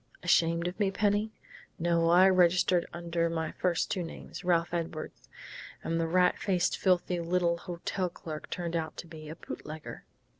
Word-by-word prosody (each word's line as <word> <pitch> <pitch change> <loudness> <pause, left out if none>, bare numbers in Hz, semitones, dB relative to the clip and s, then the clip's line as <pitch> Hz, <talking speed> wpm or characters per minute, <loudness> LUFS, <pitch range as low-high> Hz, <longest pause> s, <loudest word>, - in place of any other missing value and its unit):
"Ashamed 170 -1 +3
of 180 - -5
me, 200 -2 +3
Penny?... 205 +2 +1 0.5
No, 170 0 +2
I 180 +2 +7
registered 180 -1 +4
under 170 -1 -1
my 160 -1 -2
first 175 -2 0
two 185 - 0
names 165 - -8
Ralph 170 -1 +1
Edwards. 165 -2 -5 0.5
And 165 0 -1
the 165 - 0
rat 180 +2 +3
faced, 185 -3 +1
filthy 180 -1 +1
little 170 0 +1
hotel 180 +1 -3
clerk 155 -2 -8
turned 170 -1 -3
out 160 -2 -3
to - - -6
be 155 -2 -10
a 160 - -6
bootlegger.... 155 -2 -8
170 Hz, 160 wpm, -30 LUFS, 165-180 Hz, 0.5 s, I